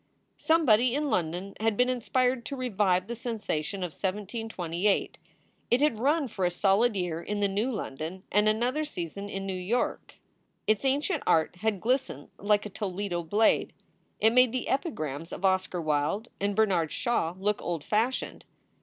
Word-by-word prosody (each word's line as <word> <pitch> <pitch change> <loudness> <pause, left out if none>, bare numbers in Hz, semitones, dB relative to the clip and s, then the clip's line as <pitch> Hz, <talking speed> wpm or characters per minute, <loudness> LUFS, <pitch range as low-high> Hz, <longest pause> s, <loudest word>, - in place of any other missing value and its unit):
Somebody 255 -7 +4
in 295 0 0
London 180 +3 -1
had 220 -1 +1
been 250 - +4
inspired 255 0 +1
to 280 - -4
revive 205 -8 +1
the 235 +3 -5
sensation 205 - -3
of 175 - -3
1728. 200 -2 -2 0.5
It 240 - +4
had 285 -7 +2
run 290 +3 +2
for 200 -5 -4
a 175 - +4
solid 200 +5 +2
year 175 -3 -2
in 205 +3 -3
the 200 - +3
new 205 +6 -1
London 175 - -5
and 210 +1 +4
another 245 +8 +1
season 200 - -5
in 195 -1 -4
New 195 - -2
York. 185 +7 -2 0.5
Its 215 +4 +1
ancient 285 +8 +1
art 160 +2 +2
had 215 0 -1
glistened 245 - -1
like 205 +1 +2
a - - -4
Toledo 190 -3 -3
blade. 205 +7 +2 0.5
It 220 +1 +4
made 250 -1 +6
the 255 +1 -3
epigrams 165 - -2
of 195 - -3
Oscar 185 -1 +1
Wilde 155 +8 0
and 200 0 0
Bernard 185 -7 +2
Shaw 180 -8 0
look 205 +2 0
old 170 -4 -3
fashioned. 225 +8 -1
205 Hz, 165 wpm, -28 LUFS, 180-240 Hz, 0.5 s, made